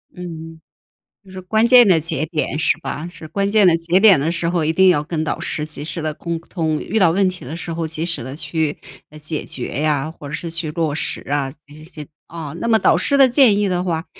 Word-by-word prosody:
嗯， 165 -2 -9 0.6
就 190 - -17
是 190 0 -8
关 220 +5 +1
键 245 -2 +7
的 170 -4 +5
节 155 -1 -2
点， 155 -2 -2
是 160 - +2
吧？ 160 0 -5
是 160 - -11
关 200 +5 -1
键 210 -1 +4
的 175 -2 +5
节 170 +3 +1
点 200 -7 +6
的 150 +4 0
时 170 0 0
候， 170 -3 0
一 160 - +1
定 190 +2 +5
要 165 -5 +3
跟 160 0 -3
导 160 - -3
师 150 -2 -3
及 150 -2 -7
时 165 +2 -4
的 155 -1 -2
沟 170 +2 -4
通， 160 -2 -3
遇 220 +4 -1
到 175 -4 +4
问 190 +1 +2
题 180 -7 -9
的 150 - -6
时 170 0 -6
候 165 -1 -3
及 160 +1 -4
时 165 -7 -2
地 130 +3 -7
去， 160 -2 -2 0.3
呃， 155 - -13
解 155 0 -5
决 125 - -5
呀， 155 0 0
或 150 - -11
者 140 - -8
是 165 +1 -5
去 165 -2 -2
落 160 -2 -1
实 - - -3
啊， 140 -2 -1
这 145 - -17
些。 155 -1 -11 0.2
啊 160 -3 -7
那 230 - -3
么 225 -1 +4
导 - - +3
师 280 - +1
的 270 -1 +7
建 240 -5 +5
议 205 - +1
的 180 -1 -1
话， 165 -2 -2
165 Hz, 270 characters per minute, -19 LUFS, 155-185 Hz, 0.6 s, 键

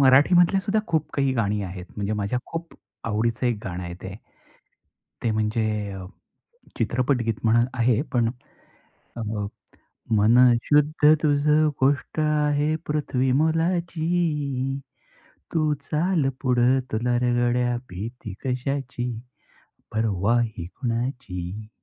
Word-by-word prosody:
मराठी 135 +5 +6
मधल्या 175 +2 +5
सुद्धा 210 +2 +1
खूप 160 -3 0
काही 135 -2 +1
गाणी 105 -3 0
आहेत, 90 -1 -6
म्हणजे 100 +1 -2
माझ्या 105 +4 -1
खूप 165 0 -6 0.3
आवडीचं 115 +3 0
एक 120 - +1
गाणं 90 -1 -4
आहे 85 0 -6
ते. 95 0 -6 1.1
ते 115 - +1
म्हणजे 110 -1 -1 0.9
चित्रपटगीत 120 0 +1
म्हणून 115 +1 +4
आहे 120 -1 +2
पण, 120 -2 +2 0.9
अ, - - -3 0.9
मन 110 +3 +5 0.3
शुद्ध 150 +1 +4
तुझं 150 +1 +3
गोष्ट 140 +3 +1
आहे 150 0 +2
पृथ्वी 135 -4 0
मोलाची, 160 -3 0 0.8
तू 155 -2 +2 0.2
चाल 160 -2 +1
पुढं 125 0 +3
तुला 120 +2 +1
रं 120 0 +1
गड्या, 120 0 +1
भीती 105 +3 -7
कशाची? 125 -1 -2 0.8
परवा 110 +1 +1
ही 110 -8 -3
कुणाची? 110 -3 -4
125 Hz, 110 wpm, -24 LUFS, 110-150 Hz, 1.1 s, मराठी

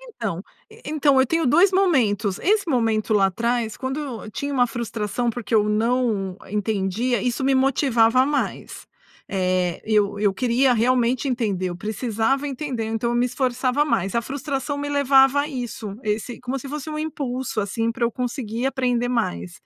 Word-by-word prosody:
Então 225 - -5 0.3
e 450 +1 -16
então, 290 -3 +3
eu 260 - +3
tenho 330 +3 +1
dois 345 +9 +5
momentos, 235 - +2
esse 400 -1 +1
momento 225 -5 +1
lá 195 -2 +5
atrás 230 +3 -1
quando 265 +2 -3 0.3
eu 215 - -9
tinha 280 +7 -4
uma 250 -3 +3
frustração 235 0 -2
porque 230 -2 -4
eu 210 -1 +4
não 215 -3 0
entendia, 210 +2 -1
isso 250 +2 -1
me 270 0 +3
motivava 255 -2 +3
mais, 290 0 -3 0.4
eh, 185 -2 0
eu 205 -2 +1
eu 205 -1 +2
queria 250 +3 +2
realmente 245 +3 +1
entender, 210 -7 -1
eu 175 - -6
precisava 225 +7 -1
entender, 260 -4 -3
então 225 +1 -1
eu 240 - 0
me 245 +1 +3
esforçava 255 +2 0
mais. 195 - -1
A 235 - +1
frustração 280 +2 -3
me 290 0 -3
levava 280 -1 +4
a 295 - -4
isso, 240 -7 -5
esse 215 +3 -3
como 255 +2 -3
se 275 - -8
fosse 300 +2 -5
um 305 - -4
impulso, 265 -6 -3
assim, 225 +3 -1
para 235 - -1
eu 235 - +1
conseguir 245 -1 -3
aprender 250 -3 0
mais. 90 - -2
245 Hz, 170 wpm, -23 LUFS, 215-270 Hz, 0.4 s, dois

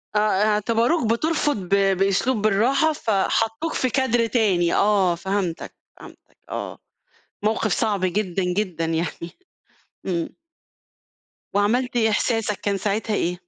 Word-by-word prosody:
آه، - - +4 0.3
اعتبروك 230 +5 +1
بترفض 295 +1 0
ب 185 -2 -8 0.3
بأسلوب 195 +4 +1
بالرّاحة، 245 +10 +2
ف 260 - -6
حطُّوك 225 +8 0
في 255 - 0
كادر 240 -3 +1
تاني 190 -8 +1
آه، 195 -4 +3
فهمتك، 185 -1 -3 0.2
فهمتك - - -16
آه، - - -5 0.7
موقف 215 -1 0
صعب 210 -4 0
جدًا، 190 0 -1
جدًا 180 -2 -1
يعني 165 +1 -3 0.7
إمم. 170 -3 -2 1.2
وعملت 240 +5 +1
إيه، 220 -2 +3
إحساسك 220 -1 0
كان 200 -1 -1
ساعتها 210 +2 -2
إيه؟ 175 +1 -1
210 Hz, 120 wpm, -22 LUFS, 190-230 Hz, 1.2 s, آه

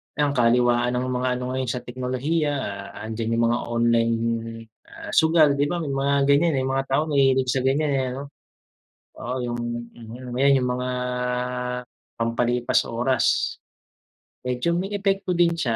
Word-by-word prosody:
ang 145 -1 +1
kaliwaan 120 -1 +3
ng 125 - 0
mga 125 0 -1
ano 125 - -4
ngayon 130 0 -2
sa 125 +1 -3
teknolohiya 130 +5 -1 0.5
andiyan 115 +1 -2
yung 115 - +2
mga 120 - +1
online, 115 0 +2 0.7
ah, - - -9
sugal 160 -3 +4
'di 145 - +3
ba 170 +1 -2
may 145 - -3
mga 140 +1 +1
ganyan, 155 +2 +3
eh, 130 - 0
mga 135 +1 -1
tao 135 +3 +2
mahilig 135 -4 +2
sa 135 - +1
ganyan, 140 +4 +1
eh, 135 -2 +1
noh? 140 +1 -7 0.8
Oo 125 +2 -4
yung 120 -1 -3 0.4
mhm 120 +2 -9
ayun 135 +1 +4
yung 125 - -1
mga 125 0 -3 1.3
pampalipas 120 +1 +1
oras. 125 +3 +1 0.8
Medyo 125 +5 -1
may 190 +4 -1
epekto 195 -2 0
din 170 0 +4
siya, 135 -9 -1
130 Hz, 150 wpm, -24 LUFS, 120-145 Hz, 1.3 s, sugal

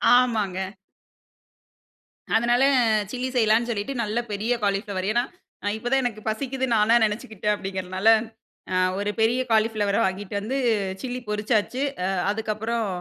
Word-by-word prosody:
ஆமாங்க. 220 -7 +2 1.8
அதனால, 240 +3 +3 0.5
சில்லி 255 0 -2
செய்யலானு 225 0 +3
சொல்லிட்டு, 230 +4 -2
நல்ல 215 +2 -1
பெரிய 215 +4 0
காலிஃப்ளவர். 200 -1 -1
ஏன்னா, 240 +2 +2 0.5
இப்ப 240 +2 -6
தான் 270 - +4
எனக்கு 220 -3 -3
பசிக்குதுனு 260 +1 -2
நானா 220 +2 +4
நெனைச்சுக்கிட்டேன், 210 -1 -2
அப்படிங்கிறனால. 190 0 -3 0.6
அ, - - 0 0.2
ஒரு 205 0 -1
பெரிய 235 +3 +3
காலிஃப்ளவர 215 -2 +2
வாங்கிட்டு 190 +2 -3
வந்து, 255 +6 -2 0.5
சில்லி 250 0 -4
பொறிச்சாச்சு. 210 +4 0 0.2
அ, - - 0 0.2
அதுக்கப்புறம் 220 +1 -2
220 Hz, 120 wpm, -24 LUFS, 205-240 Hz, 1.8 s, தான்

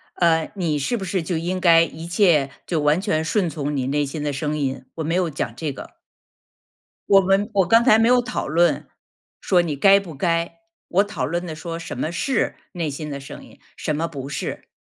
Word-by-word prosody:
呃 165 -2 +3
，e - - -14
你 160 -6 -1
是 235 - -1
不 190 - -5
是 185 -1 -1
就 165 +1 -2
应 180 +3 -2
该 165 -2 +6
一 165 0 -6
切 170 -7 +3 0.2
就 165 -3 -1
完 150 +4 +3
全 160 -6 0
顺 185 +2 +1
从 150 -2 -3
你 130 -2 -1
内 145 +1 +1
心 145 +2 -5
的 145 -1 -1
声 150 +2 -2
音， 135 -2 -2
我 160 - -3
没 165 - -1
有 180 -2 +1
讲 150 - -4
这 155 -3 -3
个。 - - -10 1.1
我 195 -1 +7
们 195 +3 +1
我 190 -3 +3
刚 230 +1 +5
才 220 -3 +6
没 225 - +4
有 250 0 +5
讨 245 - -3
论， 170 +4 +2 0.5
说 180 -2 +3
你 160 -4 -2
该 195 +7 +6
不 175 -6 -9
该， 170 - -1 0.3
我 195 +3 +3
讨 170 -11 -5
论 175 +5 -2
的 160 - -5
说 165 0 -6
什 165 - -7
么 160 - -2
是 260 +10 -1 0.2
内 170 -4 -3
心 150 +1 -6
的 140 - -5
声 135 - -10
音？ - - -18 0.2
什 155 - -2
么 165 +2 -1
不 140 -4 -7
是。 140 - -5
165 Hz, 240 characters per minute, -22 LUFS, 150-185 Hz, 1.1 s, 我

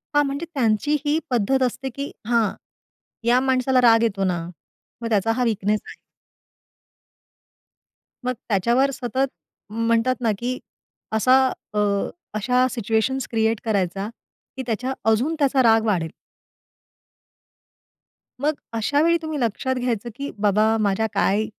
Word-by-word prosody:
हां. 290 - +5
म्हणजे 280 +4 -3
त्यांची 255 +2 +1
ही 295 +1 +2
पद्धत 255 +2 +1
असते 255 +2 -2
की 280 +1 -4 0.2
हां, 230 -4 +3 0.8
या 245 +2 +4
माणसाला 260 0 +2
राग 230 -1 +6
येतो 200 -4 0
ना 180 -2 0 0.6
मग 230 - -2
त्याचा 220 0 +2
हा 250 - +1
वीकनेस 215 -2 0
आहे. - - -10 2.3
मग 250 - +1 0.2
त्याच्यावर 235 +8 +2
सतत 260 +2 -1 0.4
म्हणतात 230 +3 +1
ना, 225 - +2
की 250 +1 -2 0.6
असा 255 +4 +5 0.4
अ, 210 - 0 0.6
अशा 250 +4 +2
सिच्युएशन्स 230 +3 0
क्रिएट 225 -1 +1
करायचा 195 -1 -1 0.5
की 260 - -3
त्याच्या 245 +3 -1 0.2
अजून 255 +9 +2
त्याचा 275 -2 +3
राग 225 -1 +4
वाढेल. 175 -6 0 2.3
मग 300 +2 +2 0.2
अशावेळी 290 +9 +2
तुम्ही 315 -2 -4
लक्षात 250 +2 -1
घ्यायचं, 240 -2 -2
की 280 +2 -5
बाबा 210 +2 +3
माझ्या 205 +2 +1
काय 205 +3 +2
235 Hz, 125 wpm, -23 LUFS, 215-260 Hz, 2.3 s, राग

